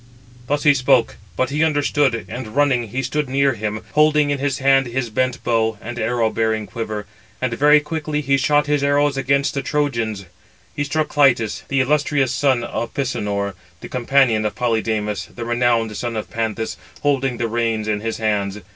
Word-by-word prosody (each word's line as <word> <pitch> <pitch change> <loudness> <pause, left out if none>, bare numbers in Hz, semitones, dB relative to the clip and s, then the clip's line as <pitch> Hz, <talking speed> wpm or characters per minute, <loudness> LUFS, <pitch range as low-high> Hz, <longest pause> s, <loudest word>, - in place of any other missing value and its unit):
Thus 145 +1 0
he 145 - +6
spoke; 130 -2 +2 0.2
but 130 +1 0
he 150 +2 +1
understood; 145 -5 +1
and 125 -3 -7
running, 135 -5 +2
he 130 +6 -3
stood 145 +2 -2
near 135 +1 +2
him, 110 -1 -4
holding 150 -1 +3
in 145 - -1
his 140 -1 -1
hand 135 -1 +3
his 120 -1 -3
bent 130 +3 -1
bow, 110 -2 +1
and 120 +3 -7
arrow 115 0 0
bearing 110 -1 0
quiver; 105 +1 -5 0.3
and 130 -2 -1
very 150 +4 +5
quickly 150 0 -3
he 140 -1 +2
shot 145 +2 +2
his 145 -1 0
arrows 145 0 +2
amongst 140 +2 +1
the 140 - -1
Trojans. 115 -9 -1 0.5
He 145 - -1
struck 155 +2 -1
Clitus, 125 -7 +2
the 135 -1 +1
illustrious 140 -1 +1
son 130 -2 +2
of 115 0 -4
Pisenor, 105 -7 -2 0.3
the - - -8
companion 125 -3 +2
of 105 - -2
Polydamas, 110 -5 -1
the 120 - -5
renowned 120 -2 +1
son 120 +2 -3
of 110 - -5
Panthous, 110 -3 -3 0.3
holding 135 -3 +1
the 115 - -1
reins 115 -1 -1
in 105 -1 0
his 115 +1 -3
hands. 105 -2 -1
125 Hz, 180 wpm, -20 LUFS, 110-140 Hz, 0.5 s, he